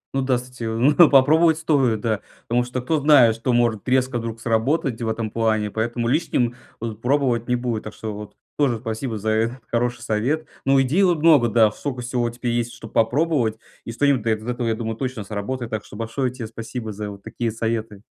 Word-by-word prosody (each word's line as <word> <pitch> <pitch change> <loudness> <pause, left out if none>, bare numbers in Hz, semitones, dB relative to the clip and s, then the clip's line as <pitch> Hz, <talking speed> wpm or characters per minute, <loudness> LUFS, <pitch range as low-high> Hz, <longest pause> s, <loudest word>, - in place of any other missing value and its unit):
Ну 135 - +2
да 130 -1 +1
кстати, 125 0 -9
но 135 +9 +5
попробовать 155 +4 +5
стоит, 135 -9 +1
да 110 -2 0 0.3
потому 120 +1 +2
что 125 +1 -4
кто 155 +4 +1
знает, 135 -6 +6
что 115 +3 -1
может 120 -4 +1
резко 130 -1 +1
вдруг 115 -1 -5
сработать 120 +3 0
в 115 - -2
этом 110 -1 -3
плане, 110 -2 0
поэтому 115 +2 -2
лишним 120 -3 +1 0.2
вот 110 -1 -6
пробовать 125 -3 +1
не 125 - +2
будет. 120 -3 -2
Так 110 - -8
что 110 -1 -5
вот 105 0 -9 0.2
тоже 135 -6 +1
спасибо 115 +1 -4
за 110 +1 -2
этот 115 +3 -1
хороший 120 0 0
совет. 120 +8 -1 0.2
Ну 135 0 +4
идей 135 +8 +2
вот 180 -4 +3
много, 150 -6 +5
да, 110 -1 +4
сколько 130 +2 -5
всего 120 -1 -1
теперь 120 +1 -3
есть, 120 0 -1
чтоб 115 -2 -11
попробовать, 120 -1 +1 0.3
и - - -5
что-нибудь 140 +1 +2
да 110 +1 +1
из 110 0 -6
этого 120 -1 -2
я 115 - +1
думаю 110 -1 -4
точно 130 -4 -4
сработает. 110 +4 -4
Так 110 -2 -3
что - - -13
большое 115 +4 -2
тебе 125 -2 -7
спасибо 115 0 -6
за 105 0 -5
вот 100 -1 -11
такие 115 +1 -3
советы. 110 -2 -3
120 Hz, 210 wpm, -22 LUFS, 110-130 Hz, 0.3 s, знает